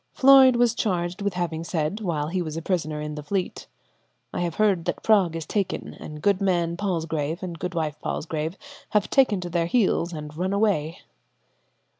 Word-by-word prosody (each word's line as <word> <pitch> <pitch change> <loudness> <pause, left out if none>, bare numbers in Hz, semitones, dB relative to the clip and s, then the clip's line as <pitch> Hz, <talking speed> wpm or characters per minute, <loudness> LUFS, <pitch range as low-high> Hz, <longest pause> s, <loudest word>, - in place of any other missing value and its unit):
Floyde 265 -1 +7
was 240 -1 +3
charged 180 -4 -1
with 200 -2 -1
having 165 -2 -2
said, 165 +3 -2
while 155 -6 -1
he 185 +2 -1
was 155 -2 -4
a - - -3
prisoner 155 -5 -1
in 150 0 -4
the 150 - -6
Fleet, 185 +5 -3 0.7
"I - - -2
have 170 -2 -2
heard 200 -6 +2
that - - -3
Prague 195 -7 +4
is 165 -1 -4
taken, 200 -3 -2
and 150 -1 -9
goodman 185 -4 +2
Palsgrave 165 -3 -2
and 170 -3 -5
goodwife 165 -5 -3
Palsgrave 160 +3 -3 0.4
have 205 - -1
taken 235 -8 +3
to 175 - -5
their 170 -1 +1
heels 185 -5 +2
and 150 -2 -7
run 185 +4 -1
away." 195 -6 0
175 Hz, 175 wpm, -25 LUFS, 160-200 Hz, 0.7 s, Floyde